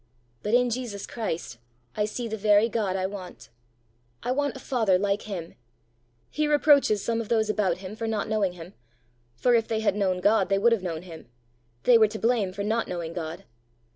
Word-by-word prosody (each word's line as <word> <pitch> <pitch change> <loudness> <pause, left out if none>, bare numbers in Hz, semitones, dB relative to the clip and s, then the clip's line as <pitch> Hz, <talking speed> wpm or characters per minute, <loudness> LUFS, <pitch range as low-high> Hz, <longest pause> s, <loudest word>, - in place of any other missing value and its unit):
But 210 +3 +1
in 245 0 +3
Jesus 230 -5 -4
Christ 165 - -5 0.4
I 210 - +1
see 230 +3 -4
the 220 - -3
very 210 +1 +4
God 210 -5 -1
I 185 -1 -1
want. 190 -2 -8 0.7
I 245 - -1
want 285 +2 0
a - - -7
father 225 -9 +2
like 200 +2 -1
him. 175 -4 -5 0.8
He 305 0 0
reproaches 285 -8 +4
some 230 0 0
of 220 - -8
those 220 -2 +2
about 195 -5 0
him 190 +2 -8
for 225 +1 -4
not 220 -2 -1
knowing 210 -4 0
him 175 +1 -11 0.6
for, 245 - +2
if 230 -1 +3
they 220 -1 -1
had 210 -3 +1
known 190 -3 0
God, 210 +4 +3
they 195 - +3
would 235 +4 +4
have 230 -4 +2
known 170 -3 -4
him: 165 -3 -11 0.6
they 240 -2 +6
were 220 - +6
to 215 +1 -6
blame 225 -4 +1
for 200 +2 -5
not 220 +2 0
knowing 170 -2 -4
God. 165 -1 -5
210 Hz, 200 wpm, -26 LUFS, 185-230 Hz, 0.8 s, they